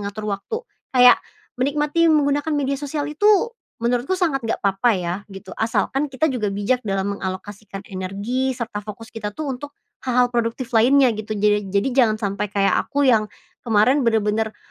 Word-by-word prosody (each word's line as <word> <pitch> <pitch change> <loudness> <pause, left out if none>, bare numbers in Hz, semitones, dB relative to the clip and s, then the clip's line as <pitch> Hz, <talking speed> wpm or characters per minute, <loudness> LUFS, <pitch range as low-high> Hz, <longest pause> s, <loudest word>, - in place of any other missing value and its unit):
mengatur 205 +1 -5
waktu. 445 - -4 0.3
Kayak 250 0 +7 0.4
menikmati 295 +5 +1
menggunakan 290 0 +2
media 275 -1 -1
sosial 290 0 -3
itu 310 +8 0 0.5
menurutku 245 +9 0
sangat 330 -7 0
nggak 225 -2 -2
apa-apa 195 +4 +2
ya, 175 -1 -2
gitu, 195 -1 -10
asalkan 265 +7 0
kita 270 +2 0
juga 215 -5 -1
bijak 205 +6 0
dalam 195 -2 -2
mengalokasikan 195 +1 -6
energi 205 +8 -3
serta 225 -3 -4
fokus 215 +2 -10
kita 210 -2 -6
tuh 300 -3 -3
untuk 285 +3 -8 0.2
hal-hal 250 -1 +1
produktif 235 +2 -2
lainnya 250 +2 +5
gitu. 215 0 -5
Jered 205 -1 +1
jadi 200 +6 +1
jangan 235 -5 +3
sampai 200 -1 -2
kayak 200 -1 +1 0.2
aku 285 0 +1
yang 220 -5 +3 0.3
kemarin 230 +5 +3
bener-bener 220 -2 0
230 Hz, 160 wpm, -21 LUFS, 205-270 Hz, 0.5 s, Kayak